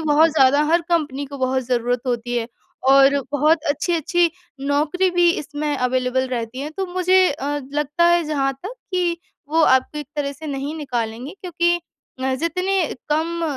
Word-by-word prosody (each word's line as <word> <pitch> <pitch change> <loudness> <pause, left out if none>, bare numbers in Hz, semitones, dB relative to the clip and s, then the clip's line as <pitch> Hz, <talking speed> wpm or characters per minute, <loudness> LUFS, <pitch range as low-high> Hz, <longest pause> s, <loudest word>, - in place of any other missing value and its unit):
बहुत 310 +1 +4
ज़्यादा 285 0 +4
हर 340 - +4
कंपनी 295 -5 0
को 280 0 -9
बहुत 260 0 0
ज़रूरत 245 0 0
होती 245 0 -2
है। 230 - -3 0.4
और 275 +1 +6
बहुत 305 +2 +2
अच्छी-अच्छी 335 +3 +1 0.4
नौकरी 310 +6 +1
भी 350 -1 +4
इसमें 290 0 -3
अवेलेबल 255 0 0
रहती 245 0 -4
है 295 - -4
तो 385 -1 -2
मुझे 370 +1 +4
अ, 290 +1 -3
लगता 295 +3 0
है 345 0 +4
जहाँ 275 -3 0
तक 425 +6 -6 0.2
कि 350 -2 +1 0.3
वो 320 +1 +2
आपको 260 +2 +3
एक 295 - -6
तरह 280 -1 -1
से 310 +3 -10
नहीं 280 +1 -4
निकालेंगे 245 -3 -4
क्योंकि 345 -1 +1 0.5
अ, 265 0 +1
जितने 365 +6 0 0.2
कम 330 +3 -1
295 Hz, 165 wpm, -21 LUFS, 265-340 Hz, 0.5 s, और